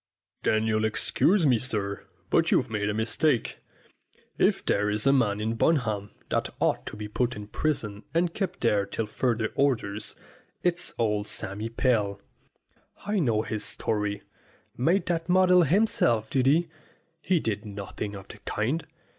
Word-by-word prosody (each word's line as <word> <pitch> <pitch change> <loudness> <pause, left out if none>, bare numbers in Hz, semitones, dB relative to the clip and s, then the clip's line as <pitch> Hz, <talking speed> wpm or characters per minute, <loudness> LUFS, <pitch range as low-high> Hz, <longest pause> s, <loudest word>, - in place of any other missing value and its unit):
"Then 110 0 +2
you'll 110 -1 +1
excuse 165 - +2
me, 125 -5 +4
sir, 105 -5 -3 0.2
but - - +3
you've - - +2
made 105 -1 -1
a - - 0
mistake. 120 +4 0 0.8
If - - +2
there 105 +1 +2
is 105 +2 -1
a 135 - +5
man 105 -6 +2
in 110 +1 -1
Bunham 115 -6 +1 0.2
that - - 0
ought - - 0
to - - -6
be 105 0 -5
put 120 +3 -1
in 105 0 -7
prison 110 -4 -2
and 170 +1 +1
kept 190 -3 -3
there 105 -4 +2
till 110 +2 -2
further 115 0 0
orders, 110 -7 0 0.5
it's 175 0 -1
old 105 -2 0
Sammy 105 +1 -3
Pell. 110 -4 +1 0.9
I 205 0 0
know 115 -9 +2
his 110 -2 -3
story. 105 -2 -1 0.5
Made 170 +10 +2
that 170 -1 -2
model 180 0 +6
himself, 180 - +2
did 130 -2 +2
he? 165 +5 +4 0.5
He 180 0 +2
did 105 -6 -2
nothing 100 0 -6
of 95 0 -10
the - - -11
kind. 145 +9 -2
115 Hz, 155 wpm, -27 LUFS, 105-155 Hz, 0.9 s, model